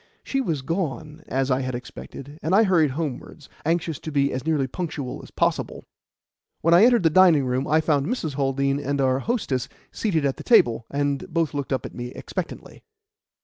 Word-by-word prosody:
She 270 Hz, -, -1 dB
was 160 Hz, -, -2 dB
gone, 155 Hz, -1 st, -3 dB
as 135 Hz, +1 st, 0 dB
I 130 Hz, +1 st, +2 dB
had 130 Hz, -1 st, -3 dB
expected, 140 Hz, +4 st, -9 dB
and 165 Hz, +5 st, +1 dB
I 220 Hz, -, +6 dB
hurried 175 Hz, -7 st, +3 dB
homewards, 150 Hz, -1 st, -5 dB, 0.2 s
anxious 165 Hz, -2 st, 0 dB
to 155 Hz, -, -6 dB
be 140 Hz, -1 st, +1 dB
as 130 Hz, -, -3 dB
nearly 155 Hz, -3 st, +1 dB
punctual 145 Hz, -3 st, -5 dB
as -, -, -13 dB
possible. -, -, -1 dB, 0.8 s
When 165 Hz, +1 st, +3 dB
I 180 Hz, +6 st, +8 dB
entered 240 Hz, -5 st, +4 dB
the 165 Hz, -, +4 dB
dining 165 Hz, -5 st, +6 dB
room, 130 Hz, +2 st, -1 dB
I 155 Hz, +2 st, +3 dB
found 145 Hz, -3 st, +1 dB
Mrs. 185 Hz, -, -2 dB
Haldean 140 Hz, 0 st, 0 dB
and 140 Hz, 0 st, -2 dB
our 130 Hz, -1 st, +2 dB
hostess 140 Hz, -, -2 dB, 0.2 s
seated 165 Hz, -9 st, 0 dB
at 135 Hz, -, 0 dB
the -, -, -8 dB
table, 120 Hz, -, +4 dB
and 145 Hz, +5 st, -2 dB
both 165 Hz, -2 st, 0 dB
looked 140 Hz, -1 st, -4 dB
up 130 Hz, -, -1 dB
at -, -, -8 dB
me 120 Hz, 0 st, -5 dB
expectantly. -, -, -6 dB
145 Hz, 190 wpm, -24 LUFS, 135-165 Hz, 0.8 s, I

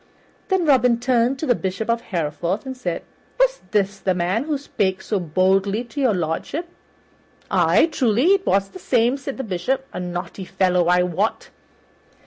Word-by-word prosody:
Then 380 Hz, -3 st, +1 dB
Robin 250 Hz, -5 st, +4 dB
turned 245 Hz, +1 st, +2 dB
to 310 Hz, -, -3 dB
the 245 Hz, -, +4 dB
Bishop 190 Hz, 0 st, -3 dB
of 230 Hz, 0 st, +1 dB
Hereford 170 Hz, -, -3 dB
and 260 Hz, 0 st, -5 dB
said, 180 Hz, -10 st, -4 dB, 0.4 s
"Was -, -, +2 dB
this 195 Hz, -1 st, 0 dB
the 185 Hz, -2 st, 0 dB
man 185 Hz, +8 st, 0 dB
who 305 Hz, -2 st, -1 dB
spake 195 Hz, -9 st, -1 dB
so 200 Hz, +1 st, -2 dB
boldly 190 Hz, +5 st, +1 dB
to 250 Hz, +4 st, -6 dB
Your 245 Hz, -6 st, +3 dB
Lordship?" 175 Hz, -, -3 dB, 0.8 s
"Ay, -, -, +4 dB
truly 260 Hz, -, +3 dB
it 390 Hz, -1 st, +1 dB
was 195 Hz, 0 st, +2 dB
the 370 Hz, -, -11 dB
same," 245 Hz, -4 st, +2 dB
said 275 Hz, 0 st, -6 dB
the 265 Hz, -, -3 dB
Bishop, 245 Hz, +7 st, -2 dB
"a -, -, -4 dB
naughty 175 Hz, +1 st, -5 dB
fellow, 180 Hz, -2 st, +1 dB
I 180 Hz, 0 st, +4 dB
wot. 180 Hz, +5 st, -2 dB
215 Hz, 170 wpm, -22 LUFS, 185-265 Hz, 0.8 s, Robin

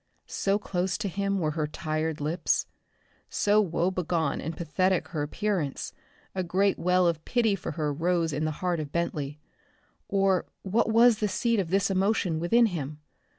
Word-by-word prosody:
So 195 Hz, +1 st, 0 dB
close 185 Hz, -2 st, -2 dB
to 210 Hz, -, -2 dB
him 200 Hz, +1 st, -1 dB
were 155 Hz, -5 st, 0 dB
her 155 Hz, -1 st, -1 dB
tired 155 Hz, +1 st, -2 dB
lips. 160 Hz, +4 st, 0 dB, 0.6 s
So 210 Hz, +1 st, +3 dB
woe 175 Hz, -1 st, 0 dB
begone 170 Hz, -5 st, -1 dB
and 160 Hz, +1 st, -5 dB
pathetic 185 Hz, +2 st, 0 dB
her 155 Hz, -3 st, -3 dB
appearance, 160 Hz, -1 st, -2 dB, 0.4 s
a 190 Hz, -, -1 dB
great 190 Hz, +3 st, +1 dB
well 180 Hz, 0 st, +3 dB
of 165 Hz, -2 st, 0 dB
pity 230 Hz, -4 st, +2 dB
for 185 Hz, -, -5 dB
her 150 Hz, -3 st, -1 dB
rose 165 Hz, +1 st, 0 dB
in 150 Hz, +2 st, -1 dB
the 155 Hz, -, +1 dB, 0.2 s
heart 175 Hz, -2 st, +1 dB
of 150 Hz, -2 st, -5 dB
Bentley 150 Hz, -4 st, -2 dB, 0.7 s
or 195 Hz, -2 st, +2 dB, 0.2 s
what 215 Hz, +4 st, +1 dB
was 230 Hz, 0 st, +6 dB
the 210 Hz, -, +1 dB
seat 215 Hz, +4 st, +1 dB
of 180 Hz, -4 st, -1 dB
this 195 Hz, +2 st, +2 dB
emotion 190 Hz, -3 st, +1 dB
within 230 Hz, +8 st, +4 dB
him? 155 Hz, -8 st, -3 dB
180 Hz, 170 wpm, -27 LUFS, 160-195 Hz, 0.7 s, was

